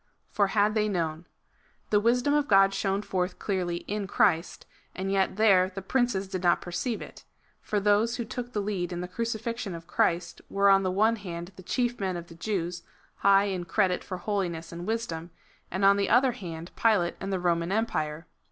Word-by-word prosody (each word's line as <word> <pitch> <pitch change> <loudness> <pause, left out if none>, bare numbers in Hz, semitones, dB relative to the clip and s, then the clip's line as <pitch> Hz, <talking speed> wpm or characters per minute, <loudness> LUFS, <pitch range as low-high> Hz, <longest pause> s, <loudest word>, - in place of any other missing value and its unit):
For 200 -1 +2
had 205 +1 +2
they 215 -1 +1
known. 165 -3 -2 0.6
The 210 - +5
wisdom 245 +6 +2
of 295 -1 +2
God 195 -1 +5
shone 195 +1 -1
forth 185 -2 -2
clearly 180 -4 -2
in 205 -1 -3
Christ, 165 -3 +1 0.3
and 190 +1 -3
yet 195 -1 +1
there 195 -3 +4
the 195 0 -7
princes 240 -3 0
did 185 -1 -4
not 175 -1 +3
perceive 210 +7 -3
it; - - -13 0.4
for 210 - -1
those 210 +3 +2
who 235 - -3
took 245 +2 -6
the 210 - -1
lead 190 -3 -2
in 175 0 -3
the 180 - -4
crucifixion 230 -1 -3
of 165 0 -9
Christ 175 0 0
were 200 0 +4
on 195 0 +5
the 185 - 0
one 215 +5 +2
hand 175 -3 -7
the - - -11
chief 240 +5 -1
men 190 -3 -1
of 170 0 -9
the - - -11
Jews, 175 -2 -3 0.4
high 195 0 +5
in 190 -3 -2
credit 180 +1 +1
for 185 - -5
holiness 180 -4 -3
and 175 +1 -7
wisdom; 195 -8 -3 0.4
and 190 +2 0
on 200 0 +6
the 200 -1 0
other 260 0 +5
hand 170 -7 -8
Pilate 205 -7 +2
and 195 - -3
the 190 - 0
Roman 170 0 0
empire. 160 -8 -1
195 Hz, 200 wpm, -28 LUFS, 175-215 Hz, 0.6 s, on